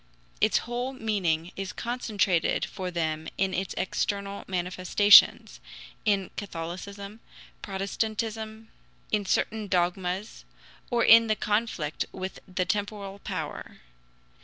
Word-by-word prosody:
Its - - +4
whole 245 +2 -3
meaning 185 -8 -1
is 195 0 -4
concentrated 210 -8 0
for 185 -1 -5
them 160 -2 -2
in 190 -1 +1
its 190 0 -2
external 200 +1 -2
manifestations 185 +2 +5 0.5
in 200 -3 +1
Catholicism, 200 +3 -6 0.4
Protestantism, 220 +2 -3 0.4
in 205 -2 0
certain 215 +2 0
dogmas, 180 +2 -1 0.5
or 235 -2 +2
in 230 0 +8
the 215 - +2
conflict 210 -9 -1
with 190 0 -6
the 185 -1 -1
temporal 200 0 -3
power. 175 -7 -6
200 Hz, 105 wpm, -27 LUFS, 180-215 Hz, 0.5 s, in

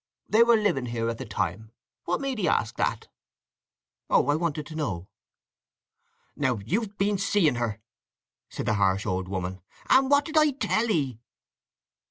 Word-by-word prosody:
They 220 - +4
were 235 0 +6
living 175 - 0
here 115 -1 -2
at 115 - -8
that 130 -5 -7
time. 95 +3 -3 0.4
What 175 +7 -1
made 270 -4 -2
'ee 180 - +1
ask 110 - +1
that?" - - -1 1.0
"Oh—I 145 - +3
wanted 155 -2 -2
to 155 - -9
know." 100 - -3 1.3
"Now 130 -5 0
you've 205 - -2
been 200 0 +1
seeing 185 -7 +2
her!" 115 -3 -2 0.7
said - - -5
the - - +1
harsh 95 -1 +1
old 95 -2 -2
woman. 95 0 -4 0.3
"And 265 0 +5
what 285 0 +4
did 315 -1 -2
I 305 -2 +5
tell 220 -2 0
'ee?" 135 - 0
150 Hz, 160 wpm, -26 LUFS, -, 1.3 s, were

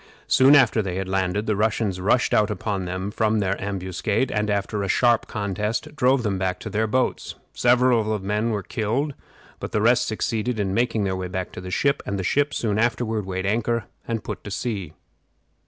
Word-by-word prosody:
Soon 135 +2 +6
after 120 -5 +5
they 95 -3 -3
had 95 0 -3
landed 95 +2 0
the 110 - +1
Russians 105 -3 0
rushed 120 +6 +2
out 105 0 +3
upon 100 -2 -2
them 95 +3 -3
from 110 0 +1
their 100 -2 +1
ambuscade, 100 +4 -1
and, 105 0 0
after 100 +1 -1
a 100 - -2
sharp 120 +3 +3
contest, 105 +5 -3
drove 130 -3 +3
them 100 -3 -1
back 90 -1 -1
to - - -6
their 110 +1 +1
boats. 130 +4 -1 0.2
Several 120 -3 +3
of 105 -2 -1
the - - -7
men 105 +3 0
were 105 -4 -2
killed, 120 +9 -1 0.5
but - - -6
the - - +2
rest 120 +3 +3
succeeded 110 +1 -1
in 95 -2 0
making 115 -1 +1
their 95 -1 -1
way 95 -1 -4
to 90 -1 -5
the 90 - -7
ship, 140 +9 +1
and 100 - -3
the 95 - -3
ship 145 +9 +1
soon 105 -2 -1
afterward 115 -3 0
weighed 95 0 -3
anchor 115 +2 0 0.2
and 115 -2 -2
put - - -6
to - - -7
sea. 100 -6 -4
105 Hz, 205 wpm, -23 LUFS, 95-115 Hz, 0.5 s, Soon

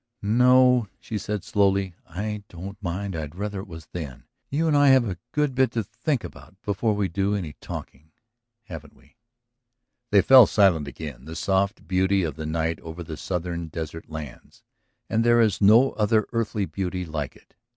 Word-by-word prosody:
"No," 125 +2 +5
she 110 - -5
said 105 -1 -4
slowly. 100 -2 +1 0.2
"I 105 +5 -4
don't 100 +5 -9
mind. 95 +1 -3
I'd 75 -1 -5
rather 100 +1 -4
it 100 - -8
was 80 -3 -10
then. 75 -8 -7 0.3
You 160 +4 0
and 155 - +3
I 145 0 +5
have 130 -3 +5
a 90 -4 -5
good 150 -2 0
bit 130 0 +3
to 115 - 0
think 140 - -2
about - - -12
before 105 +2 0
we 100 -2 0
do 100 +4 0
any 85 -7 -4
talking. 75 +4 -9 0.5
Haven't 80 -6 -10
we?" - - -25 0.9
They 100 -2 +5
fell 130 0 +9
silent 90 -8 +3
again. 70 -2 -8
The 80 +1 -8
soft 100 +2 0
beauty 95 +1 +2
of 80 -4 -3
the 80 -1 -5
night 80 0 -1
over 80 +2 -8
the 80 -1 -7
southern 85 +1 -4
desert 80 0 -7
lands... 75 -5 -9 0.4
and 110 +1 +1
there 120 0 +4
is 110 -4 +2
no 115 +7 +6
other 110 0 +2
earthly 110 -3 -1
beauty 90 -1 -4
like 75 -4 -4
it - - -22
95 Hz, 180 wpm, -25 LUFS, 80-110 Hz, 0.9 s, fell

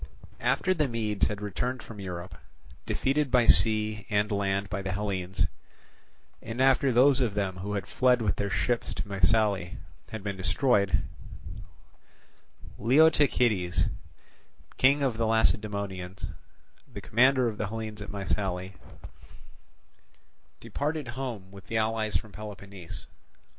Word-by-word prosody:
After 185 - +2
the 155 -5 +1
Medes 110 -4 0
had 105 -1 -5
returned 120 +5 -3
from 110 -3 -10
Europe, 90 -1 -6 0.5
defeated 140 +1 +1
by 125 -2 +4
sea 110 -2 +3
and 105 0 +1
land 100 0 0
by 100 0 -3
the 95 -1 -3
Hellenes, 95 -3 -1 1.0
and 115 +2 -6
after 135 0 +4
those 130 +3 +5
of 115 -5 0
them 95 -2 -1
who 100 +3 -4
had 100 - -2
fled 125 -1 +3
with 105 -6 0
their 100 - -1
ships 120 +4 -1
to 100 +2 -4
Mycale 100 -1 +1 0.3
had 110 -3 -6
been 100 -1 -3
destroyed, 100 0 +2 1.8
Leotychides, 125 - +3 0.9
king 140 +2 +4
of 125 -5 0
the 115 -1 +1
Lacedaemonians, 100 -4 -1 0.7
the - - -7
commander 130 +2 +3
of 110 -2 -4
the 105 - -1
Hellenes 110 -1 -6
at 100 - -7
Mycale, 95 -2 -2 1.9
departed 150 -2 -3
home 120 -7 -5
with 100 -1 -13
the 115 - -1
allies 110 -1 +1
from 110 - -10
Peloponnese. 100 -4 -9
105 Hz, 125 wpm, -28 LUFS, 100-120 Hz, 1.9 s, those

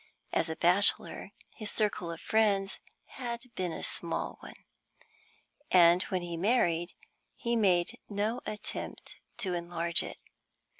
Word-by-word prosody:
As - - +1
a 160 - -3
bachelor, 180 +5 +4 0.2
his 215 -2 -3
circle 205 -5 -1
of 165 - -7
friends 200 -3 +1 0.3
had 235 -2 -6
been 180 -2 -2
a - - -5
small - - -1
one, - - -11 1.1
and 175 0 +6
when 185 -2 -2
he 170 -1 -5
married 175 -4 +1 0.4
he 235 -1 -1
made 185 -6 +2
no 210 +4 -1
attempt 210 - -5 0.2
to 195 -6 -2
enlarge 170 -1 0
it. - - -7
185 Hz, 130 wpm, -30 LUFS, 170-215 Hz, 1.1 s, and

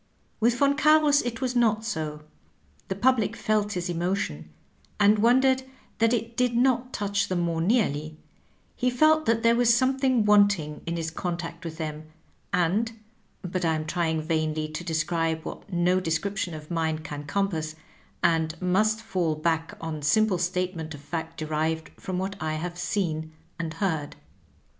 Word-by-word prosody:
With 235 +2 +2
Yon 280 0 +4
Carus 300 -1 +5
it 240 0 -4
was 255 -1 -1
not 225 -2 +2
so; 155 -7 -4 0.6
the 190 - -2
public 230 0 +2
felt 210 -2 0
his 180 0 -2
emotion, 175 - -2 0.5
and 210 +1 +5
wondered 260 +3 +4 0.4
that 230 0 +4
it 230 -1 -1
did 250 -1 +1
not 250 0 +2
touch 200 -2 -1
them 180 -2 0
more 165 -1 0
nearly; 155 - +1 0.6
he 250 - +1
felt 310 +5 +3
that 225 0 +2
there 230 0 +5
was 240 -1 +4
something 260 -1 +2
wanting 200 -7 +3
in 170 0 -2
his 165 -1 -3
contact 170 0 -4
with 160 -2 -6
them, 155 -1 -5 0.4
and 200 +5 +1 0.3
— 195 - -12
^but 180 +1 -2
I 160 -1 +2
am 155 0 -3
trying 160 -1 -1
vainly 155 -1 -1
to 155 +2 -5
describe 165 -1 -1
what - - -8
no 180 +1 +2
description 180 +1 -2
of 155 +1 -10
mine 160 -2 -1
can 145 -1 -6
compass, 160 -2 -1 0.5
and 160 -1 +1
must 215 +5 +1
fall 180 -7 0
back, 160 +1 -1
on 160 -2 -5
simple 205 +4 +3
statement 175 -3 -2
of 145 - -12
fact 160 +2 -5
derived 155 +1 -2
from 185 -2 -3
what 190 +2 -2
I 155 0 -1
have 175 +3 -4
seen 170 -3 -2 0.3
and 160 -2 -4
heard. 160 -6 -2
180 Hz, 160 wpm, -26 LUFS, 160-220 Hz, 0.6 s, Carus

